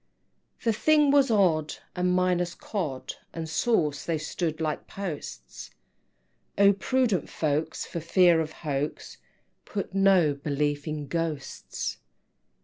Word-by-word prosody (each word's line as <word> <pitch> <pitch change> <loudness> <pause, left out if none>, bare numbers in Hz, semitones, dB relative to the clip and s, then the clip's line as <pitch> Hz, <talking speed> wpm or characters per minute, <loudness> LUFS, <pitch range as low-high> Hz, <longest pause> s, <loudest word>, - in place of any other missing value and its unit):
XVII. - - -23
The 230 - +2
thing 300 +2 +5
was 280 -2 +5
odd, 170 -8 +2 0.2
and 180 0 +1
minus 180 -1 +1
Cod 140 -11 -4 0.2
And 165 -1 -4
sauce, 160 - +1
they 165 -2 -1
stood 155 +1 -3
like 155 -2 -2
posts; 150 - -7 0.9
Oh, 200 0 +6
prudent 235 -1 0
folks, 155 0 -1
for 170 - -5
fear 170 0 +4
of 155 -1 -4
hoax, 145 0 -3 0.5
Put 200 -2 -5
no 195 -6 +4
belief 145 +1 -2
in 150 -1 -3
Ghosts! 165 -2 -4
165 Hz, 125 wpm, -27 LUFS, 150-195 Hz, 0.9 s, Oh